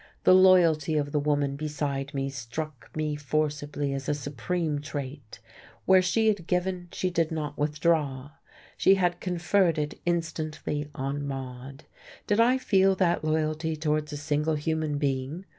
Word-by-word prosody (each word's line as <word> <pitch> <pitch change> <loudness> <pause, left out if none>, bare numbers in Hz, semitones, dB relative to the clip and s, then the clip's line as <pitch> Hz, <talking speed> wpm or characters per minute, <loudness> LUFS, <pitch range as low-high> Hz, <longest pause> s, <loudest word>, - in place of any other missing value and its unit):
The - - +6
loyalty 170 -5 +5
of 145 -1 -1
the 150 - +1
woman 145 -1 0
beside 145 -2 -3
me 135 0 -1
struck 135 +3 -6
me 155 -1 -1
forcibly 145 0 -2
as 135 -1 -4
a 150 - +1
supreme 150 +3 -2
trait. 140 -5 -7 0.5
Where 190 -1 +6
she 220 +5 +1
had 200 -6 0
given, 180 0 -1
she 185 - -2
did 165 -2 0
not 150 -2 -3
withdraw. 150 -2 0 0.5
She 195 - +5
had 175 -2 0
conferred 175 -1 +1
it 150 0 -3
instantly 155 -3 -2
on 140 +2 -3
Maude. 135 +1 -7 0.4
Did 205 +1 +1
I 245 +3 +5
feel 195 -6 +3
that 175 -3 +1
loyalty 155 +1 0
towards 150 0 -1
a 145 - -4
single 150 +2 0
human 155 0 -1
being? 140 +5 -2
155 Hz, 150 wpm, -27 LUFS, 145-170 Hz, 0.5 s, The